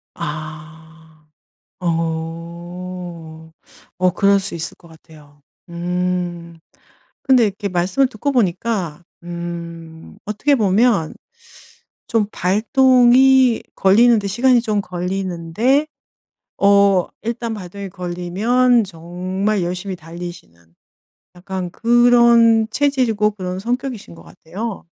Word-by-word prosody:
아. 155 +1 -9 0.5
어. 165 0 -5 0.5
어 185 0 +4
그럴 200 0 +3
수 190 - -6
있을 165 0 -5
것 170 - -19
같아요. 150 -3 -18 0.3
음. 175 -1 -3 0.6
근데 260 -3 +4
이렇게 200 0 -4
말씀을 185 +9 +1
듣고 260 +4 -3
보니까 185 - -1 0.2
음 170 -1 -8
어떻게 215 +8 +1
보면 205 -4 +2 0.9
좀 225 -2 +1
발동이 255 - +4
걸리는데 215 +2 +4
시간이 240 +4 +3
좀 215 -3 0
걸리는데 185 - -1 0.7
어 200 -2 +4 0.2
일단 235 0 -3
발동이 195 0 -8
걸리면 195 +8 +1
정말 185 +3 -3
열심히 180 +2 -4
달리시는 165 - -11 0.6
약간 185 0 -5
그런 235 0 +4
체질이고 245 -6 +1
그런 185 -2 -5
성격이신 245 -2 -4
것 - - -14
같아요. 200 +6 -7
185 Hz, 200 characters per minute, -19 LUFS, 170-230 Hz, 0.9 s, 어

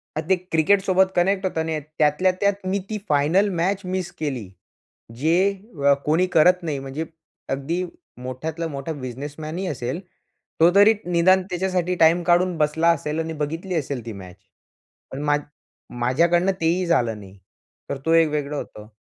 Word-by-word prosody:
आणि 155 +2 -4
ते 190 - +5 0.2
क्रिकेटसोबत 190 +3 +3
कनेक्ट 190 +2 +2
होता 160 -3 -1
नाही 160 0 -2
येत, 150 - -4 0.2
त्यातल्या 155 +5 +3
त्यात 200 -1 0
मी 195 +2 0
ती 215 - -2
फायनल 160 +8 +3
मॅच 195 +3 0
मिस 185 -1 -3
केली, 130 -11 -3 0.7
जे 160 +6 +2 0.5
अ, - - +7
कोणी 160 +5 +2
करत 180 +3 +5
नाही 155 -4 -2
म्हणजे 135 +4 -5 0.4
अगदी 155 +7 -2 0.4
मोठ्यातलं 155 +6 -4
मोठा 140 +2 -4
बिझनेसमॅनही 145 +6 -6
असेल, 130 +2 -3 0.6
तो 170 - +7
तरी 205 +2 +7
निदान 180 +2 +4
त्याच्यासाठी 180 0 -1
टाईम 165 +1 +4
काढून 175 +1 +2
बसला 155 +2 +2
असेल 150 -1 -3
आणि 160 0 -3
बघितली 165 +5 -4
असेल 140 -6 -3
ती 115 - -5
मॅच. 95 -3 -11 0.7
पण 140 +2 -6
मा 145 0 +3 0.6
माझ्याकडनं 170 +9 +2
तेही 175 +2 +1
झालं 120 -10 +1
नाही, 95 -1 -14 0.5
तर 140 - -2
तो 165 - +3
एक 165 -1 +5
वेगळं 150 -1 -2
होतं. 105 -6 -8
160 Hz, 160 wpm, -23 LUFS, 145-180 Hz, 0.7 s, अ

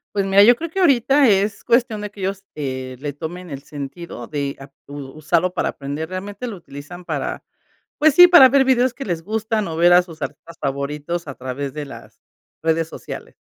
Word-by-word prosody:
Pues 195 -1 +1
mira, 195 +1 +6
yo 240 +4 +7
creo 330 +7 -5
que 385 - -4
ahorita 275 -4 +4
es 200 0 +1
cuestión 235 -3 +1
de 210 - -6
que 210 - -16
ellos, 195 0 -3
eh, 130 -3 -5
le 145 +1 -4
tomen 175 +5 -7
el 140 -1 -7
sentido 145 -3 -8
de 140 -2 -3
ap 135 0 -12
u 145 - -9 0.2
usarlo 170 +4 0
para - - 0
aprender. 145 +3 -5
Realmente 200 +6 -6
lo 230 - -5
utilizan 170 +1 -11
para, - - -4 0.6
pues 310 -1 +4
sí, 355 +3 +10
para 345 -7 +8
ver 275 0 +4
videos 255 -1 +2
que 275 - -6
les 170 -4 -2
gustan 215 +1 -2
o 160 - -5
ver 175 +1 +5
a 180 - +8
sus 165 -3 -10
artistas 165 +4 -7
favoritos 145 +4 -3
a 140 - -6
través 130 +2 -5
de 150 -1 -4
las 135 - -13 0.4
redes 160 0 +1
sociales. - - -9
175 Hz, 205 wpm, -21 LUFS, 145-220 Hz, 0.6 s, sí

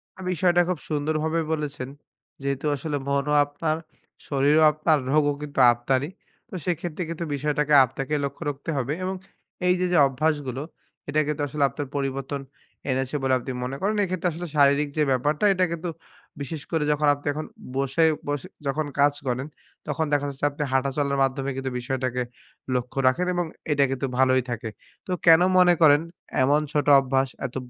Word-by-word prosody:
না, - - -19
বিষয়টা 175 0 +3
খুব 180 -4 -1
সুন্দরভাবে 155 +2 0
বলেছেন। 145 -4 -4 0.5
যেহেতু 140 +1 -2
আসলে 145 +1 -3
মনও 140 +1 0
আপনার, 155 +2 -2 0.5
শরীরও 145 +3 +3
আপনার, 155 +1 +2
রোগও 145 -1 +3
কিন্তু 145 -2 -5
আপনারই, 130 +4 -1 0.4
তো - - -17
সেক্ষেত্রে 175 0 -2
কিন্তু 165 0 -4
বিষয়টাকে 150 +1 0
আপনাকে 135 +4 -5
লক্ষ্য 140 - -6
রাখতে 145 +2 -6
হবে 135 +2 -1
এবং 190 +1 -2 0.5
এইযে 180 0 +2
যে - - +4
অভ্যাসগুলো, 135 -1 -1 0.5
এটা 150 +1 +1
কিন্তু 150 -1 -2
আসলে 145 +1 -1
আপনার 145 0 -5
পরিবর্তন 135 0 -3 0.5
এনেছে 130 +2 -1
বলে 130 -1 +2
আপনি 130 +2 -6
মনে 130 +2 -3
করেন। 205 +3 +1
এক্ষেত্রে 185 -2 -1
আসলে 175 +2 -6
শারীরিক 145 0 +4
যে 155 - +4
ব্যাপারটা, 145 +7 0
এটা 185 -1 +2
কিন্তু 170 +1 -3 0.5
বিশেষ 145 +2 -5
করে 160 -3 +1
যখন 150 0 +1
আপনি 145 0 -8
এখন 155 +2 -4 0.3
বসে, 135 +4 +1 0.2
বসে 145 -2 -3 0.2
যখন 150 +3 0
কাজ 145 +1 +5
করেন 130 +2 -1 0.4
তখন 150 +2 -1
দেখা 145 0 +2
যাচ্ছে 140 +1 -3
আপনি 145 +1 -3
হাঁটা 135 +1 +2
চলার 140 -1 0
মাধ্যমে 135 +1 -1
কিন্তু 135 0 -3
বিষয়টাকে 125 0 -2 0.5
লক্ষ্য 125 +2 -3
রাখেন। 160 +8 +2
এবং 175 -1 0 0.3
এটা 145 -1 +3
কিন্তু 135 0 -2
ভালোই 130 0 +4
থাকে। 115 -1 -4 0.4
তো - - -4
কেনো 165 +1 +7
মনে 180 -1 +6
করেন, 145 -2 +7 0.4
এমন 145 +3 +3
ছোট 150 -3 0
অভ্যাস 135 0 0 0.2
এত 130 - -6
145 Hz, 165 wpm, -25 LUFS, 135-155 Hz, 0.5 s, কেনো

